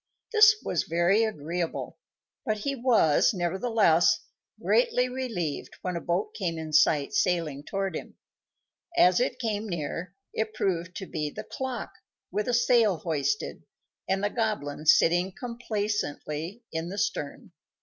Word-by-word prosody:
This 430 0 +8
was 175 - 0
very 175 +6 +3
agreeable; 170 -4 -3 0.4
but 215 -1 -1
he 275 +7 -2
was, 230 - +3
nevertheless, 185 -1 +3 0.4
greatly 470 - +2
relieved 230 - -4
when 180 -1 -2
a 170 - -3
boat 175 +4 -1
came 175 -5 -2
in 160 -1 -6
sight 150 +2 +4
sailing 170 -8 0
toward 195 +3 -3
him. - - -7 0.8
As 180 - +6
it 250 0 0
came 220 -3 -2
near, 170 +2 -4 0.2
it 220 0 -2
proved 180 -1 -1
to 190 - -5
be 155 -4 -3
the - - -7
clock, 260 -2 -5 0.4
with 210 0 -1
a 245 - 0
sail 230 -5 +4
hoisted, 155 +3 -2 0.5
and 195 +1 +1
the 205 - +1
Goblin 160 -10 -2
sitting 175 +4 +4
complacently 210 - -3
in 160 +1 -3
the 195 - -6
stern. 205 -8 -3
190 Hz, 140 wpm, -27 LUFS, 165-220 Hz, 0.8 s, This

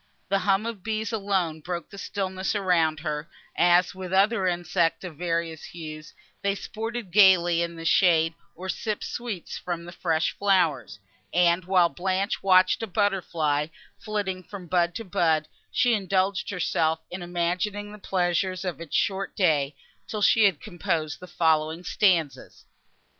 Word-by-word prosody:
The 195 - +2
hum 195 +2 +1
of 230 -4 -5
bees 220 +1 -2
alone 190 -7 -1
broke 175 0 -5
the 200 - -9
stillness 190 0 -3
around 165 -6 +2
her, 150 0 -4 0.3
as, 175 +1 +4
with 185 -1 -7
other 195 +1 +3
insects 175 -1 0
of 180 -4 -7
various 165 -1 -2
hues, 155 -2 -9 0.3
they 200 0 0
sported 225 -1 -5
gaily 175 -3 +5
in 170 0 -3
the 165 0 -8
shade, 165 -2 +4 0.2
or 185 +3 -7
sipped 215 +2 -3
sweets 230 -8 -5
from 170 -1 -4
the 175 - -8
fresh 165 -2 0
flowers: 160 - +1 0.3
and, 175 0 +3
while 180 -2 +4
Blanche 190 +5 -2
watched 185 0 +4
a 225 - -3
butter 205 -1 +1
fly, 150 -3 -1 0.3
flitting 205 -4 -3
from 185 +1 -10
bud 175 0 +1
to 225 - -5
bud, 160 -4 +1 0.2
she 245 -1 +3
indulged 195 -1 0
herself 160 -4 0
in 180 +1 -5
imagining 180 +4 -2
the 210 - -11
pleasures 185 0 0
of 175 -2 -4
its 165 - -5
short 195 0 0
day, 150 -7 +2 0.3
till 210 -1 -3
she 220 +1 +5
had 185 -7 +2
composed 170 -4 -3
the 180 - -10
following 160 -1 +1
stanzas. 175 -6 0
180 Hz, 155 wpm, -26 LUFS, 165-195 Hz, 0.3 s, gaily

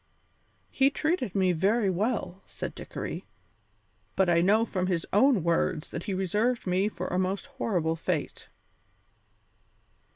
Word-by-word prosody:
"He 270 0 +4
treated 285 - -1
me 190 -2 +3
very 195 +4 +2
well," 195 -1 -2
said - - -6
Dickory, - - -6 0.9
"but 190 -2 +3
I 170 0 +4
know 210 +5 +4
from 185 -4 -2
his 175 -3 0
own 215 - +4
words 165 -2 0
that 170 - -5
he 195 - -2
reserved 210 +6 0
me 185 +3 +1
for 185 -4 -6
a 180 - 0
most 190 +6 -1
horrible 195 - -1
fate." 165 -2 -3
190 Hz, 135 wpm, -28 LUFS, 180-225 Hz, 0.9 s, He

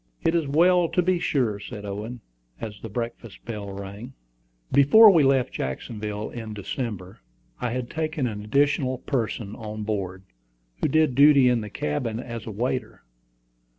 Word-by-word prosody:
"It 165 - +2
is 165 -4 +1
well 170 +4 +4
to 180 - +2
be 180 0 +2
sure," 120 -11 0
said 105 0 -8
Owen, 105 +4 -6 0.4
as 105 -2 -7
the 115 - -7
breakfast 115 -1 -6
bell 105 -3 -5
rang. 100 +6 -8 0.6
Before 200 +11 +8
we 170 -4 +5
left 135 -2 +2
Jacksonville 105 - -4
in 110 -3 -7
December, 100 -3 -5 0.4
I 125 - -1
had 125 +1 -3
taken 155 -2 -2
an 105 -3 -4
additional 135 +2 +1
person 115 -5 -3
on 110 -1 -6
board, 95 -3 -3 0.6
who - - +3
did 155 -1 +3
duty 140 -1 +6
in 120 -2 +2
the 105 - -6
cabin 110 +8 -2
as 120 -3 -7
a - - -4
waiter. 125 +4 -3
120 Hz, 155 wpm, -25 LUFS, 105-140 Hz, 0.6 s, Before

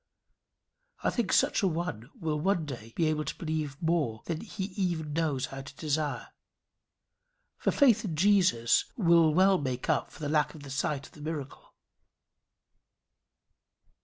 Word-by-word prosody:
I - - +2
think 235 -6 -1
such - - +3
a 195 - +3
one 160 - -3
will 155 -2 -1
one 175 0 +1
day 120 -6 -8
be 165 - +2
able 155 -1 +1
to 140 - -4
believe 155 -4 -3
more 160 -10 0
than 165 -2 -3
he 215 -3 -6
even 170 -6 -1
knows 150 -5 0
how 135 0 -7
to 135 - -11
desire. 150 -1 -2 1.3
For - - +1
faith 240 -7 +4
in 175 -7 -3
Jesus 180 - +3
will 170 -6 +5
well 190 +4 +4
make 130 -3 -1
up - - 0
for - - -14
the 150 - -3
lack 150 0 +1
of 150 - -11
the 140 - -9
sight 140 +1 -1
of - - -14
the 150 - -13
miracle. 150 -3 -6
155 Hz, 160 wpm, -29 LUFS, 145-175 Hz, 1.3 s, will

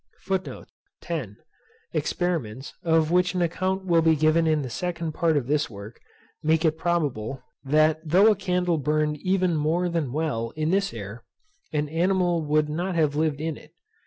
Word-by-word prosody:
FOOTNOTES: 170 - -5 0.6
Experiments, 135 -9 -2
of 160 -1 +2
which 180 +1 +2
an 180 - +2
account 185 +3 -1
will 170 -2 +4
be 160 0 +4
given 155 +2 +3
in 155 -2 +2
the 130 - -5
second 170 +2 -3
part 160 -1 +1
of 135 - -1
this 145 +3 0
work, 100 +1 -10 0.4
make 160 +1 +2
it 160 -1 +3
probable, 145 -8 -1 0.2
that 155 +3 +3
though 185 +7 +5
a - - +2
candle 180 -3 0
burned 150 +1 0
even 185 +1 +1
more 165 +4 +1
than 165 -7 -1
well 140 -6 -1
in 155 +1 0
this 195 +1 +1
air, 110 +1 -8 0.5
an 150 -1 -1
animal 175 +1 +1
would 150 0 +2
not 175 +5 -2
have 155 -3 +2
lived 155 -2 0
in 160 0 -3
it. - - -17
160 Hz, 165 wpm, -25 LUFS, 150-175 Hz, 0.6 s, though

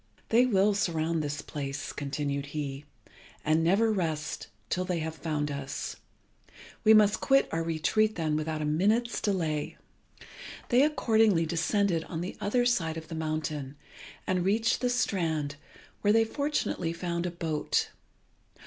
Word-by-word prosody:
"They 240 +3 +5
will 205 -2 +3
surround 165 -5 0
this 145 -1 -3
place," 140 -1 -5
continued 140 0 -3
he, 140 -1 -4 0.6
"and 155 +1 +3
never 200 +7 +3
rest 160 -5 -2 0.2
till 185 - -1
they 180 -1 -1
have 160 0 -3
found 150 -2 -2
us. 140 -1 -4 0.9
We 220 - +6
must 215 -1 +5
quit 270 0 +4
our 165 - 0
retreat 165 +7 +1
then 155 -3 0
without 155 0 -2
a - - -1
minute's 210 +10 +1
delay." 165 -7 -1 0.9
They 245 +1 +5
accordingly 220 - +3
descended 170 +1 +1
on 165 -1 -5
the 180 - -5
other 245 +4 +1
side 165 -10 +1
of 160 -1 -8
the - - -6
mountain, 155 -3 -3 0.5
and 185 -1 0
reached 220 +4 +2
the 250 - +2
strand, 160 -11 0 0.5
where 205 - +3
they 225 +1 +4
fortunately 255 - -1
found 170 0 -2
a - - -1
boat. 165 -3 -1
165 Hz, 145 wpm, -29 LUFS, 155-210 Hz, 0.9 s, We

